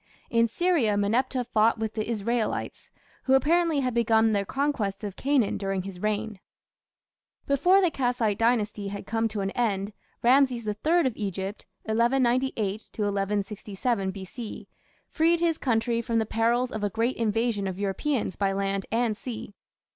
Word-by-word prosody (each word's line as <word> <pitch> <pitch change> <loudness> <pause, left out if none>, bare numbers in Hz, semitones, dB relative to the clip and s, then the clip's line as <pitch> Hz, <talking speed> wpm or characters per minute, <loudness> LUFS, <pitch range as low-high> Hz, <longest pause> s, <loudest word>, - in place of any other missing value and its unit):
In 230 0 +4
Syria, 255 - +1
Meneptah 245 +5 +1
fought 225 -1 +3
with 220 -1 -3
the 215 0 -3
Israelites, 230 +1 -2 0.4
who 265 - +5
apparently 325 +1 +3
had 255 -2 -1
begun 225 -1 +3
their 200 -1 0
conquest 230 -7 -1
of 200 -3 -5
Canaan 270 -6 +1
during 195 -2 -2
his 190 -2 -8
reign. 215 -1 -2 1.1
Before 355 +8 +4
the 360 -3 +2
Kassite 245 -6 0
Dynasty 220 -3 +1
had 200 0 -6
come 225 +1 0
to 215 -2 -4
an 195 0 -2
end, 205 -3 -1 0.3
Rameses 250 -1 +4
III 305 +12 +1
of 255 -4 0
Egypt 195 0 -4 0.2
(1198 235 -2 +1
1167 205 +1 -1
B.C.) 195 +4 -7 0.4
freed 330 +1 +3
his 335 -2 +1
country 230 -1 +1
from 230 0 -1
the 220 - +2
perils 235 +3 +1
of 215 -1 -4
a 205 - +1
great 230 +5 -1
invasion 225 -2 0
of 185 -1 -4
Europeans 205 - -1
by 195 -1 0
land 195 0 -1
and 230 -1 +1
sea. 220 -2 -7
225 Hz, 150 wpm, -27 LUFS, 205-250 Hz, 1.1 s, who